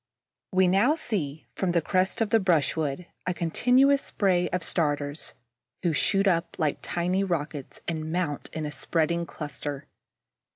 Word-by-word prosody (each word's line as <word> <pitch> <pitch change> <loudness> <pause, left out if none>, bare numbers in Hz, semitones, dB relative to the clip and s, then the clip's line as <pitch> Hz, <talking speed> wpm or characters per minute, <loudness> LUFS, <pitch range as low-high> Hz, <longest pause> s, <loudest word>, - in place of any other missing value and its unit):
We 185 -1 +4
now 200 - +4
see, 165 - -2
from 185 -3 -1
the 170 - +4
crest 185 +4 +1
of 215 -2 +1
the 225 - +5
brushwood, 160 -3 +1 0.2
a 180 - 0
continuous 255 - +3
spray 185 -3 +1
of 180 -2 -2
starters, 145 -3 -1 0.5
who 170 -3 +2
shoot 195 +5 +2
up 175 -3 +1
like 155 -3 0
tiny 180 +3 0
rockets 150 -6 -3
and 160 -1 -3
mount 165 -5 -2
in 160 -2 -4
a 150 - -4
spreading 170 +3 0
cluster. 145 -2 -6
170 Hz, 150 wpm, -27 LUFS, 155-190 Hz, 0.5 s, the